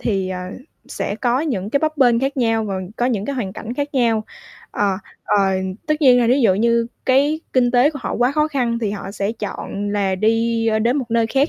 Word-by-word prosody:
thì, 195 -4 -1
ờ, 185 -1 -4 0.5
sẽ 200 - -3
có 245 +2 +1
những 215 - -2
cái 280 - +2
bấp 310 0 -1
bênh 245 -4 +4
khác 270 +1 -1
nhau 225 -3 +1
và 200 -2 -3 0.2
có 240 - +1
những 220 -6 -1
cái 280 - -3
hoàn 205 -7 -3
cảnh 230 +4 -6
khác 285 +1 -3
nhau. 230 -4 +2 0.5
Ờ, 200 -2 0 0.3
ờ, - - +1 0.5
tất 305 - +2
nhiên 255 -4 +6
là 235 - +2
thí 255 +4 +3
dụ 220 -7 +4
như 235 +3 +2 0.2
cái 285 +4 +3
kinh 250 -2 +3
tế 250 +4 +4
của 295 - -7
họ - - -3
quá 245 +2 +2
khó 305 +1 +1
khăn 245 -5 -1
thì 220 -3 -1
họ 200 -1 -6
sẽ 200 +1 -2
chọn 205 -2 -5
là 200 -2 0
đi 225 +3 +1
đến 240 +4 +2
một 255 -5 -3
nơi 230 0 +2
khác 275 +6 +1
235 Hz, 230 wpm, -20 LUFS, 210-265 Hz, 0.5 s, nhiên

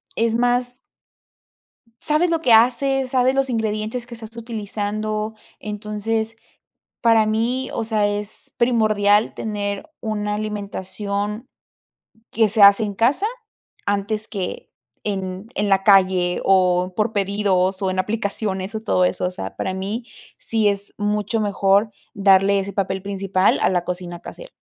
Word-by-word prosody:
Es 230 0 +1
más. 245 +1 0 1.2
Sabes 310 +3 +2
lo 330 -1 +1
que 250 -6 +4
haces, 260 +3 +3
sabes 255 0 +3
los 270 -1 +1
ingredientes 220 +1 -2
que 245 - -10
estás 225 -1 -10
utilizando. 215 -1 -3 0.2
Entonces, 215 +2 -3 0.7
para 225 -2 +5
mí, 235 +4 0
o - - -1
sea, 215 -2 +1
es 205 +1 -5
primordial 215 -3 +3
tener 205 +4 -4
una 210 -1 -2
alimentación 205 +1 -4 0.8
que 225 -1 +3
se 210 +1 0
hace 200 +2 +8
en 205 -1 -3
casa 255 - +2 0.6
antes 205 +2 -1
que 190 -4 -5 0.4
en 190 -1 -4
en 205 0 0
la 195 -1 +3
calle 185 -3 +4
o 185 -1 +3
por 215 +1 0
pedidos 195 -2 +1
o 190 - 0
en 185 - -2
aplicaciones, 200 -1 -2
o 220 - -3
todo 195 -4 +1
eso. 180 - 0
O 180 - -1
sea, 95 - -7
para 190 - -2
mí 200 +5 -4 0.3
sí 220 -2 +1
es 200 0 -4
mucho 210 +1 -1
mejor 200 +1 +2 0.2
darle 195 0 +4
ese 195 +1 -4
papel 190 -1 -2
principal 195 -1 +1
a - - +4
la 180 -2 0
cocina 175 -1 -5
casera. - - -10
210 Hz, 140 wpm, -21 LUFS, 195-225 Hz, 1.2 s, hace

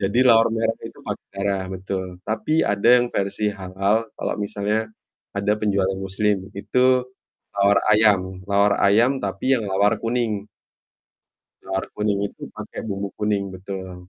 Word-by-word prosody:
Jadi 100 +4 0
lawar 115 -2 +6
merah 115 0 0
itu - - -10
pakai - - -5
darah, 100 -1 -1
betul. 95 0 -4 0.2
Tapi 155 +9 0
ada 100 +2 +1
yang 125 - +2
versi 100 +2 -1
halal, 100 +3 -1
kalau - - -2
misalnya 105 +2 -1 0.5
ada 100 +1 +1
penjual 100 -2 +1
yang 95 0 -4
muslim, 100 +2 +1 0.2
itu 125 +4 +2 0.5
lawar 100 0 +4
ayam. 95 -4 +3
Lawar 100 0 +4
ayam 115 +6 +5
tapi 100 +6 -1
yang 110 - -4
lawar 100 +3 +2
kuning. 115 -3 -1 1.2
Lawar 95 0 -2
kuning 105 -1 0
itu - - -20
pakai - - -7
bumbu 100 -1 -3
kuning, 105 -1 0
betul. 95 0 -7
100 Hz, 145 wpm, -22 LUFS, 95-110 Hz, 1.2 s, lawar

